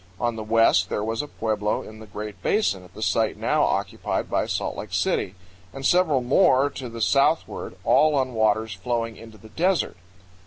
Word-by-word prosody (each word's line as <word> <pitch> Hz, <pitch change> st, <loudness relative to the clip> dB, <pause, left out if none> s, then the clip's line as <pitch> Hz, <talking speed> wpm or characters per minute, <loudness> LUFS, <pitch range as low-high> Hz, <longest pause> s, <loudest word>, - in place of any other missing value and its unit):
On 120 Hz, -1 st, 0 dB
the 110 Hz, -, -5 dB
west 110 Hz, -4 st, +3 dB
there 105 Hz, -, -2 dB
was 115 Hz, +3 st, -1 dB
a 150 Hz, -, -7 dB
pueblo 105 Hz, -5 st, -2 dB
in 110 Hz, 0 st, -11 dB
the 110 Hz, -, -11 dB
Great 105 Hz, -1 st, -7 dB
Basin 100 Hz, -, +1 dB
at 90 Hz, -, -18 dB
the -, -, -5 dB
site -, -, +1 dB
now -, -, +1 dB
occupied -, -, -1 dB
by -, -, +1 dB
Salt -, -, -2 dB
Lake -, -, -8 dB
City, 95 Hz, -, 0 dB, 0.4 s
and 135 Hz, 0 st, -6 dB
several 160 Hz, -7 st, +3 dB
more 140 Hz, +1 st, +3 dB
to 130 Hz, -3 st, -7 dB
the 115 Hz, 0 st, -7 dB
southward, 140 Hz, +7 st, +1 dB
all 155 Hz, -1 st, +4 dB
on 130 Hz, -2 st, 0 dB
waters 110 Hz, -1 st, +1 dB
flowing 115 Hz, +3 st, -3 dB
into 110 Hz, +1 st, -13 dB
the 110 Hz, +2 st, -15 dB
desert. 180 Hz, -, 0 dB
115 Hz, 190 wpm, -24 LUFS, 105-135 Hz, 0.4 s, all